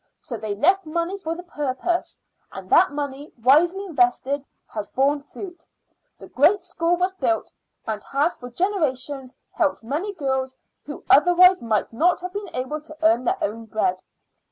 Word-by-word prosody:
So 240 - -7
they 215 -2 -4
left 370 - +2
money 340 +4 -2
for 330 -3 -3
the 350 - -8
purpose, 300 +1 -2 0.3
and - - -9
that 370 - +6
money, 285 0 -5
wisely 330 - +3
invested, 275 -3 +1 0.2
has 210 -2 -6
borne 280 +2 +2
fruit. 345 +4 -10 0.5
The - - -12
great 350 +7 +3
school 345 -1 0
was 365 +1 0
built, 340 -3 -1 0.3
and 215 -2 -4
has 290 +5 0
for 245 - -10
generations 280 -5 -1 0.2
helped 300 -8 0
many 300 - -2
girls 265 -4 -2 0.3
who 290 - -8
otherwise 360 +4 +6
might 225 -1 -1
not 345 +9 +2
have 360 0 -6
been 405 -1 -5
able 260 +4 -3
to 310 0 -13
earn 255 -6 +4
their - - +1
own 225 +3 -3
bread. 220 - -1
295 Hz, 160 wpm, -23 LUFS, 255-355 Hz, 0.5 s, that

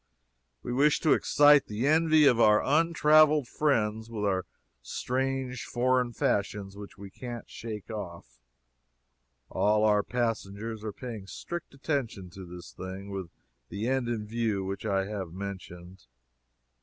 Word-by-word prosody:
We 120 - -3
wish 145 +3 +3
to 155 - +4
excite 145 -1 +5
the 105 +4 -2
envy 155 0 +5
of 125 -4 +5
our 105 -2 +5
untraveled 155 -2 +4
friends 110 -7 0
with 110 -3 -4
our 95 -2 0 0.3
strange 130 - -2
foreign 125 0 +1
fashions 100 -3 -1
which 100 0 -10
we 100 -1 -10
can't 120 +1 -7
shake 110 -2 -7
off. 85 - -8 1.1
All 105 +1 +2
our 105 -1 +4
passengers 115 -2 -3
are 110 - -3
paying 110 -3 -8
strict 170 - -7
attention 130 - -3
to 95 0 -10
this 90 0 -10
thing, 95 +2 -7
with 95 -3 -5 0.4
the 105 +3 -3
end 130 -1 0
in 110 -3 -2
view 110 -3 -1
which 100 +3 -4
I 95 -2 +1
have 95 -5 -5
mentioned. 95 -3 -8
110 Hz, 140 wpm, -28 LUFS, 100-130 Hz, 1.1 s, excite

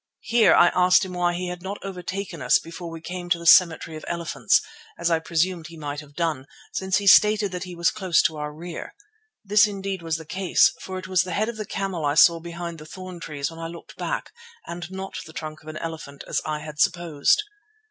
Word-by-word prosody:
Here 235 -2 +5
I 175 - +7
asked 180 +1 +4
him 185 - -7
why 175 -1 +1
he 180 0 -3
had 180 0 -6
not 195 +3 -5
overtaken 195 +1 -5
us - - +5
before 170 +1 -8
we 165 -1 -8
came 180 +1 -6
to 175 - +3
the 170 - -9
cemetery 165 -1 +5
of 155 - -8
elephants, 170 -2 +1 0.4
as 170 0 0
I 165 - +3
presumed 170 +1 -1
he 165 -1 -12
might 145 -1 -5
have 145 -1 -13
done, 155 -5 -1 0.3
since 190 0 0
he 200 - -3
stated 210 0 +6
that 180 0 -4
he 180 -1 -8
was 170 0 +2
close 185 -5 +2
in 160 - -10
our 150 0 -4
rear. 165 +3 -8 0.5
This 210 +1 +5
indeed 195 -2 -4
was 165 -1 -2
the 160 - -10
case, 185 +3 +3
for 190 0 -6
it 185 0 -7
was 185 -2 +3
the 185 -1 -4
head 215 +5 0
of 235 - -6
the 215 -2 -5
camel 195 -5 -3
I 145 0 +1
saw 165 +2 +6
behind 170 0 -6
the 155 - -10
thorn 185 +1 -9
trees 150 -3 -4
when 165 - -11
I 165 - -4
looked 170 0 -11
back, - - -3 0.3
and 175 0 -6
not 190 0 -6
the 160 - -12
trunk 155 -1 -7
of 155 - -18
an 155 0 -6
elephant 155 -4 -7
as - - 0
I 150 -1 -2
had 150 -1 -9
supposed. 170 - +2
175 Hz, 230 wpm, -24 LUFS, 160-185 Hz, 0.5 s, I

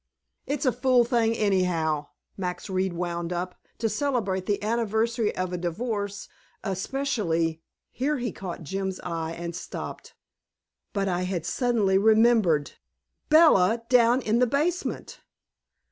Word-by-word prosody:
"It's 285 0 -1
a 255 - +4
fool 250 0 +3
thing 230 -2 +1
anyhow," 170 -7 +1 0.3
Max 180 0 -4
Reed 185 -1 0
wound 170 0 -3
up, 180 +1 -3 0.2
"to 230 - 0
celebrate 210 -6 -1
the 205 0 0
anniversary 225 0 0
of 185 0 -2
a 180 - -2
divorce 205 +3 -3 0.4
especially 190 - -1
" - - -63
Here 290 +4 -1
he 240 -3 -2
caught 180 -2 -7
Jim's 190 +3 -3
eye 165 -2 -3
and 170 0 -5
stopped. 180 - -7 0.8
But 195 -1 -1
I 180 -1 0
had 180 -3 -2
suddenly 210 -3 +2
remembered. 215 -8 +4 0.6
BELLA 235 - +5
DOWN 245 0 +4
IN 220 +2 +2
THE 250 - +4
BASEMENT! 310 +8 -2
200 Hz, 130 wpm, -26 LUFS, 180-235 Hz, 0.8 s, BELLA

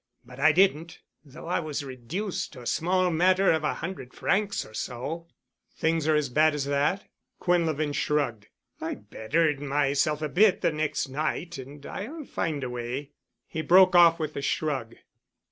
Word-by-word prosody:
But 125 +1 -13
I 155 +3 +6
didn't—though 160 -4 -1
I 175 - 0
was 150 -3 -4
reduced 140 - -4
to 125 - -10
a - - -13
small 180 +6 +1
matter 185 +4 +4
of 160 -1 +1
a 150 - 0
hundred 165 -7 -7
francs 200 0 0
or - - -15
so." 140 +10 -5 0.5
"Things 160 -1 0
are 155 - +4
as 150 -2 +1
bad 150 +4 +3
as 140 -2 -2
that——?" 145 +7 0 0.3
Quinlevin 160 -4 +1
shrugged. 125 -9 -1 0.3
"I - - -3
bettered 150 +5 -1
myself 145 +1 0
a - - 0
bit 195 +4 +4
the - - +2
next 155 -2 -1
night 155 +4 -3
and 140 +2 -10
I'll 290 +9 -6
find 150 - -3
a 130 - -3
way——" 125 +4 -5 0.4
He 160 - -4
broke 180 +3 +6
off 170 -1 +7
with 155 -1 -3
a - - -3
shrug. 140 -5 -2
155 Hz, 165 wpm, -27 LUFS, 140-170 Hz, 0.5 s, off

